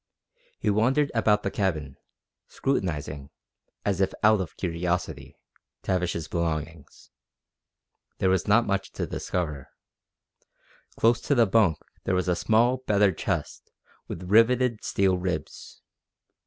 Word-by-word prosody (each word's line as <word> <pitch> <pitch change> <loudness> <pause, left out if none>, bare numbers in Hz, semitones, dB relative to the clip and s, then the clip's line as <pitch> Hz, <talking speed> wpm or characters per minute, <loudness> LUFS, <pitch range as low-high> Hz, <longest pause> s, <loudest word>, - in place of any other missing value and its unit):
He - - 0
wandered 130 +8 +2
about 105 -2 +2
the 100 - -1
cabin, 75 -9 -2 0.5
scrutinizing, 75 - -3 0.6
as 100 -2 0
if 95 - 0
out 105 -1 +5
of 85 - -7
curiosity, 90 0 -3 0.5
Tavish's 90 -4 -1
belongings. 80 -2 -4 1.1
There 95 - +2
was 95 +1 0
not 115 +3 +4
much 100 -1 -1
to - - -3
discover. 75 -7 -4 1.3
Close 120 +1 +3
to 140 - +1
the 120 -2 +5
bunk 100 -6 +3 0.3
there 95 - +1
was 90 0 0
a 90 - +2
small 115 +6 +2
battered 100 -4 +3
chest - - -3 0.4
with 85 - -6
riveted 115 +4 +3
steel 95 -2 +1
ribs. 90 -5 -5
95 Hz, 120 wpm, -26 LUFS, 85-110 Hz, 1.3 s, out